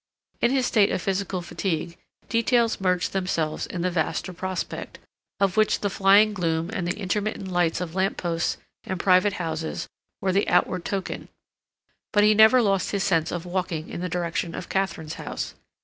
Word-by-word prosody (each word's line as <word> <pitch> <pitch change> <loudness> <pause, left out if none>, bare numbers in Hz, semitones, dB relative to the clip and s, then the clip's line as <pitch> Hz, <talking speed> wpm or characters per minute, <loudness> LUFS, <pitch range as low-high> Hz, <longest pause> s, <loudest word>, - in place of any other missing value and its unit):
In 235 - +4
his 260 -1 +2
state 210 -5 +4
of - - 0
physical 190 0 -2
fatigue, 170 -1 -3 0.3
details 230 -1 +2
merged 180 -1 +1
themselves 170 -5 -1
in 175 -2 -4
the 180 - +1
vaster 175 +2 -1
prospect, 185 0 -4 0.4
of 195 0 +1
which 215 0 +3
the 205 - 0
flying 200 +3 +5
gloom 165 -1 -1
and 185 -6 -2
the 175 - -2
intermittent 200 0 -2
lights 175 -3 +1
of 170 -3 -4
lamp 190 +1 0
posts 170 -1 -1 0.3
and 185 - -4
private 185 +2 +4
houses 160 -4 -3 0.3
were 190 - 0
the 195 +2 +1
outward 185 -2 +2
token, 195 -2 -3 0.8
but 205 - +4
he 210 0 +6
never 220 +4 +7
lost 195 -4 +1
his 200 -2 -1
sense 165 -3 +1
of 175 0 -4
walking 175 -3 -3
in - - -5
the 180 - -2
direction 170 -1 -2
of 185 - -7
Katharine's 190 -5 -2
house. - - -5
185 Hz, 175 wpm, -25 LUFS, 170-200 Hz, 0.8 s, never